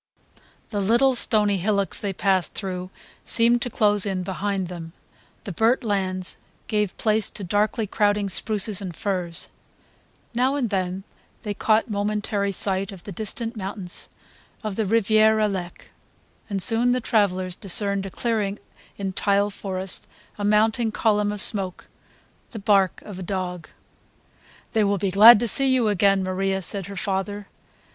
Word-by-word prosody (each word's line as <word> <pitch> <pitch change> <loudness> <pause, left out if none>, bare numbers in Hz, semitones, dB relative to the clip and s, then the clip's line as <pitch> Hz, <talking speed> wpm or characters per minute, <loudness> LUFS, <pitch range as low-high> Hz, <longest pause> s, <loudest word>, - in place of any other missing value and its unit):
The 205 -2 -2
little 240 +7 +3
stony 210 -4 +3
hillocks 200 +1 0
they 200 - -2
passed 190 -1 0
through 185 -2 -4 0.3
seemed 235 +1 +3
to 245 - -2
close 205 -3 +2
in 190 -3 -1
behind 195 0 -3
them; 165 -2 -8 0.5
the 200 - -6
burnt 225 +9 +1
lands 190 -4 -1 0.3
gave 210 -3 -1
place 215 -1 +1
to 205 - -6
darkly 210 +4 0
crowding 205 0 +1
spruces 205 +2 +1
and 180 -4 -6
firs; 180 -4 -3 0.8
now 255 +4 +1
and 245 -6 -1
then 185 0 -2 0.4
they 210 -2 -3
caught 215 +2 +1
momentary 205 -1 -1
sight 195 0 +1
of 190 -3 -11
the 205 - -8
distant 225 +4 -4
mountains 190 -3 -4 0.5
on 215 -2 -3
the 215 +1 -2
Riviere 220 0 +3
Alec; 190 -5 -3 0.6
and 195 -3 -1
soon 240 +1 +3
the 250 - 0
travellers 185 -6 0
discerned 200 +1 0
a - - -6
clearing 210 -1 -2 0.4
in 195 -1 -3
the 200 0 +2
forest, 190 -1 -3 0.3
a 205 - -6
mounting 220 +3 +2
column 210 -1 +1
of 210 -1 +1
smoke, 190 -4 +1 0.6
the 230 - -9
bark 195 -2 +1
of 195 -3 -9
a - - -6
dog. 180 -3 -4 1.0
"They 220 - +3
will 200 0 +1
be 195 0 -1
glad 210 +4 +9
to 240 - 0
see 270 +4 +2
you 245 -4 +2
again, 195 -1 +2
Maria," 190 +1 -1
said 195 +1 -1
her 200 - -8
father. 200 +2 -2
200 Hz, 150 wpm, -23 LUFS, 190-215 Hz, 1.0 s, glad